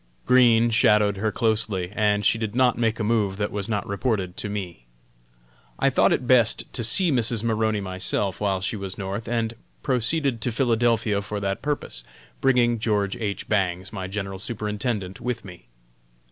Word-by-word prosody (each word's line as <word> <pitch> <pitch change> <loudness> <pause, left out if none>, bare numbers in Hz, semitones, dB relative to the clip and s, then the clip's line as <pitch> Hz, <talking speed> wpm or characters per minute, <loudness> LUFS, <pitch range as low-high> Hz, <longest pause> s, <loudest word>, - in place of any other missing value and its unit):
Green 120 -2 +5
shadowed 105 -2 +3
her 110 +2 -1
closely, 105 -5 +1
and 105 -1 +1
she 115 - +3
did 110 -1 -3
not 125 -1 +3
make 115 -1 0
a - - -1
move 105 -3 0
that 105 0 -2
was 100 +1 -4
not 105 -3 -1
reported 100 -3 -2
to 105 - -4
me. 90 -11 -6 0.9
I - - +2
thought - - +3
it 125 - 0
best 120 -3 +4
to 120 - -2
see 175 - +4
Mrs. 115 -3 0
Maroney 110 -2 0
myself 95 +1 -2
while 95 -2 0
she 110 - -2
was 95 -2 -3
North, 100 +2 -5
and 115 -1 -1 0.3
proceeded 130 0 0
to 125 - 0
Philadelphia 115 -4 +1
for 105 +1 -5
that 100 0 -2
purpose, 145 - -3 0.4
bringing 120 -3 +3
George 105 -2 0
H. 105 -4 -4
Bangs, 95 -2 -1
my 95 -3 -4
General 95 -1 -5
Superintendent, 105 -2 -3
with 120 -2 -3
me. 90 -10 -12
105 Hz, 170 wpm, -24 LUFS, 100-115 Hz, 0.9 s, Green